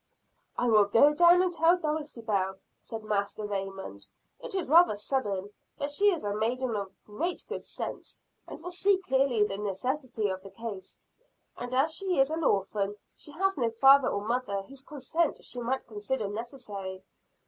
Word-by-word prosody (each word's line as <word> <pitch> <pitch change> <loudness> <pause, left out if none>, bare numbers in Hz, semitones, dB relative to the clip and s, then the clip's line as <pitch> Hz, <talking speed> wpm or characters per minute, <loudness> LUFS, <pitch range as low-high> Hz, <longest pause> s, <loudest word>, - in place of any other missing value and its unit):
"I 245 - +1
will 215 -3 +6
go 255 +9 +5
down 345 +3 +6
and 360 -1 0
tell 335 +2 +4
Dulcibel," 235 - -2 0.3
said 225 -1 -7
Master 210 0 -2
Raymond. 195 - -5 0.3
"It - - -7
is 375 -4 -1
rather 335 -4 +6
sudden, 205 -4 -2 0.3
but 285 +1 -2
she 410 +8 +4
is 345 - -3
a 205 0 -1
maiden 235 +3 -1
of 200 -2 -4
great 330 +13 -3
good - - -5
sense, - - -7 0.3
and - - -8
will 360 - -5
see 390 +2 +3
clearly 265 - +2
the 195 -1 -2
necessity 225 +3 -2
of 190 0 -4
the 195 - -11
case. 210 -4 -7 0.6
And 245 +1 -5
as 295 +5 +3
she 370 -3 0
is 270 +2 +4
an 325 +1 -2
orphan, 200 -2 0 0.2
she 295 - -10
has 385 +4 +1
no 235 -4 +1
father 270 +3 +6
or 200 0 -2
mother 225 -4 -1
whose 270 +6 -12
consent 300 +3 -2
she 250 - -5
might 255 +3 -2
consider 215 +1 -3
necessary. 205 -4 -6
240 Hz, 170 wpm, -29 LUFS, 205-300 Hz, 0.6 s, will